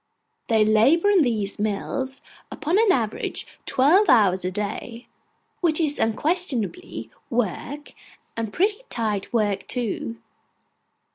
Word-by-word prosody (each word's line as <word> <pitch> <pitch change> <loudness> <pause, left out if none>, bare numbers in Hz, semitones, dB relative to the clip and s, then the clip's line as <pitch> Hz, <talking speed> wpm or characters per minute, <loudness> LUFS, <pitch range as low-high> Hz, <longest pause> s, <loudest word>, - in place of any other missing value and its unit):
They 220 -3 +3
labour 275 - +4
in 390 -4 +5
these 215 -8 -1
mills, 220 +6 -2 0.3
upon 340 +7 0
an 445 -3 +5
average, 225 - -1 0.2
twelve 335 +9 +4
hours 195 -7 +4
a 180 - 0
day, 210 +4 -5 0.5
which 330 -3 +1
is 300 -3 +1
unquestionably 300 - -1 0.2
work, 245 +5 -3 0.4
and 225 -2 -3
pretty 410 - +1
tight 215 -4 -2
work 205 -4 0
too. 210 - -2
240 Hz, 115 wpm, -24 LUFS, 210-315 Hz, 0.5 s, in